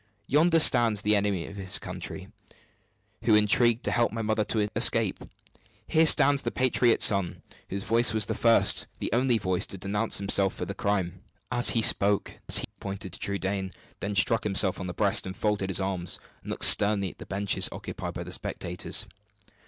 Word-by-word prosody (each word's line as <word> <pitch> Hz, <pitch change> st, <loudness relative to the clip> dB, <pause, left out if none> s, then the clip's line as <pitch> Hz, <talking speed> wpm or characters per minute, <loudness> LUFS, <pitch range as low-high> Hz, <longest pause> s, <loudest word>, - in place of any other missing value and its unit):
Yonder 160 Hz, +6 st, +2 dB
stands 120 Hz, -9 st, +4 dB
the 105 Hz, 0 st, +2 dB
enemy 100 Hz, -4 st, -1 dB
of 100 Hz, -, -11 dB
his 95 Hz, +1 st, 0 dB
country, 90 Hz, +1 st, -7 dB, 1.0 s
who 110 Hz, -, +4 dB
intrigued 115 Hz, +3 st, +2 dB
to -, -, -1 dB
help 120 Hz, -1 st, +1 dB
my 115 Hz, 0 st, -5 dB
mother 110 Hz, 0 st, 0 dB
to 105 Hz, 0 st, -1 dB
escape; -, -, +1 dB, 0.7 s
here 160 Hz, 0 st, +2 dB
stands 140 Hz, -2 st, +4 dB
the -, -, -3 dB
patriot 125 Hz, -2 st, +1 dB
son, 100 Hz, -4 st, +2 dB, 0.3 s
whose 100 Hz, 0 st, -4 dB
voice 115 Hz, +2 st, +1 dB
was 110 Hz, -2 st, 0 dB
the -, -, -3 dB
first, 115 Hz, -1 st, +3 dB
the -, -, -5 dB
only 125 Hz, 0 st, +1 dB
voice, 95 Hz, -4 st, -1 dB
to 95 Hz, -, -8 dB
denounce 105 Hz, +4 st, -3 dB
him 100 Hz, -, -6 dB
for 95 Hz, -2 st, 0 dB
the 100 Hz, -, -6 dB
crime!" 95 Hz, -3 st, -3 dB, 0.3 s
As 120 Hz, -1 st, +4 dB
he 115 Hz, -, +2 dB
spoke, 100 Hz, -1 st, +1 dB, 0.2 s
he -, -, +5 dB
pointed 95 Hz, -2 st, -7 dB
to -, -, -8 dB
Trudaine, 95 Hz, -1 st, -3 dB, 0.3 s
then 100 Hz, +1 st, -4 dB
struck 110 Hz, +4 st, +2 dB
himself 95 Hz, -2 st, +1 dB
on 90 Hz, -, -6 dB
the 90 Hz, -, -6 dB
breast, 100 Hz, -2 st, +2 dB
then 95 Hz, 0 st, -7 dB
folded 105 Hz, -1 st, -2 dB
his 95 Hz, -, +2 dB
arms, 95 Hz, -3 st, -1 dB, 0.2 s
and -, -, -12 dB
looked -, -, +2 dB
sternly 100 Hz, -3 st, +4 dB
at -, -, -24 dB
the -, -, -11 dB
benches 100 Hz, +1 st, -1 dB
occupied -, -, -7 dB
by -, -, -5 dB
the -, -, -10 dB
spectators. 90 Hz, +1 st, -2 dB
100 Hz, 185 wpm, -26 LUFS, 95-115 Hz, 1.0 s, he